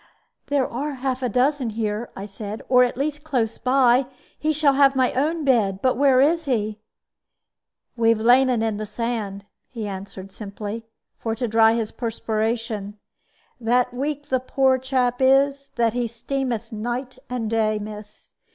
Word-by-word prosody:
"There 285 -2 +1
are 285 +5 -3
half 260 0 -2
a 250 - 0
dozen 255 +2 +1
here," 215 +1 -3
I 195 - -6
said; 205 +1 -7
"or 250 -1 +6
at 245 -1 -1
least 295 +1 -2
close 245 -8 -1
by. 255 0 +3 0.3
He 310 - 0
shall 295 -2 +3
have 275 0 +4
my 255 -1 +2
own 305 +4 0
bed. 210 -8 +2
But 255 +4 +2
where 270 0 +4
is 320 +4 +3
he?" 215 -5 -1 1.2
"We 230 -1 +2
have 230 -1 +3
laid 250 +4 +5
'un 235 -3 +1
in 220 -2 -1
the 215 0 -5
sand," 210 -3 -3 0.2
he 225 -5 -5
answered, 195 0 -8
simply, 210 +2 -7 0.3
"for 225 -1 -2
to 240 +1 -2
dry 225 0 +5
his 225 -2 -2
perspiration. 220 -2 -3 0.6
That 245 +1 +1
weak 290 +3 -3
the 260 - +2
poor 260 0 +2
chap 255 -2 0
is 275 +1 +3
that 230 -2 +2
he 245 -1 -1
streameth 235 -1 -3
night 245 +4 -4
and 245 -3 -2
day, 215 -1 +1
miss. 210 0 -9
240 Hz, 165 wpm, -23 LUFS, 220-265 Hz, 1.2 s, or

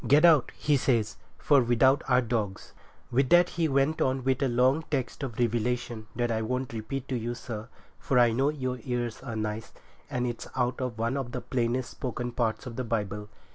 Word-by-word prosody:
Get 150 +5 +6
out,' 155 -6 +5
he 145 -1 +2
says, 115 -5 +1 0.2
'"For 145 -3 +4
without 125 +3 +4
are 125 -1 +4
dogs—"' 110 -5 -3 0.4
With 130 +1 +2
that 175 0 +6
he 165 -2 0
went 140 +2 +1
on 130 0 +1
with 130 +1 +1
a 135 - +3
long 130 +5 +3
text 130 -4 -2
of 130 -5 -5
Revelation 120 -1 -1
that 120 0 0
I 110 -1 0
won't 125 +2 -2
repeat 125 +5 -4
to 130 - -1
you, 120 0 -3
sir, 115 -2 -7 0.3
for 135 - 0
I 120 -1 +6
know 135 +5 +2
your 130 -4 -3
ears 120 -2 -3
are 125 -4 -6
nice, 110 0 -3 0.4
and 125 0 -1
it's 120 -1 -4
out 125 +1 0
of 125 -3 -3
one 115 +4 0
of 130 -3 -4
the 125 - -3
plainest 125 +1 -1
spoken 120 -2 -4
parts 115 -2 -1
of 120 -2 -7
the 130 - -1
Bible. 105 -3 -3
125 Hz, 205 wpm, -28 LUFS, 115-135 Hz, 0.4 s, Get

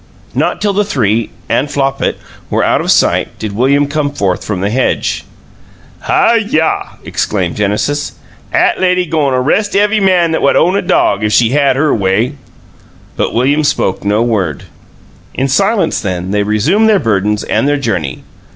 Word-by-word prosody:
Not - - -1
till 205 -1 +1
the 205 +2 +1
three 115 - 0 0.2
(and 125 +5 0
Flopit) 135 -1 -1 0.3
were - - 0
out - - +2
of - - -4
sight - - +2
did 110 - -5
William 140 +5 +2
come 145 0 -1
forth 100 -10 -2
from 100 -4 -3
the 100 +2 -1
hedge. 130 +3 -1 0.7
"Hi 235 - +2
yah!" 185 -8 -1
exclaimed 90 -5 -2
Genesis. 105 +8 -1 0.4
"'At - - +1
lady 180 -1 +2
go'n 150 -5 0
a - - +1
'rest 205 +11 0
ev'y 210 +2 +2
man 180 -4 +2
what 140 - +3
own 180 +3 +3
a 200 - +1
dog, 105 - +1
'f 105 - 0
she 115 +1 +3
had 140 0 +2
her 150 +2 +1
way!" 105 +6 0 0.8
But - - -2
William 140 +6 +2
spoke 95 -9 0
no 105 +3 +1
word. 95 - -1 0.7
In 135 - 0
silence, 195 - +1
then, 90 -2 -3
they 105 0 +1
resumed 125 - +2
their 215 - +4
burdens 105 - 0
and 135 - 0
their 145 0 +1
journey. 90 - -3
135 Hz, 170 wpm, -13 LUFS, 105-165 Hz, 0.8 s, their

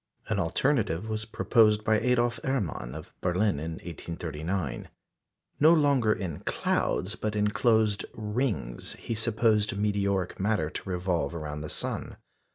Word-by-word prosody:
An - - +1
alternative 110 - +1
was 110 -1 -2
proposed 110 -1 +3
by 110 0 +3
Adolf 120 -2 +2
Erman 95 - -2
of - - -9
Berlin 90 -2 +1
in 80 +2 -4
1839. 85 -3 -4 0.7
No 155 +3 +7
longer 140 -8 +3
in 90 -8 -2
clouds, 95 +4 0
but 110 -1 -3
in 105 0 +2
closed 110 -2 +2
rings, 105 - -2
he - - -5
supposed 110 -2 +2
meteoric 100 -3 0
matter 100 -6 +1
to - - -5
revolve 90 -4 -1
round 75 -2 -5
the 75 - -5
sun. - - -3
105 Hz, 135 wpm, -28 LUFS, 85-110 Hz, 0.7 s, No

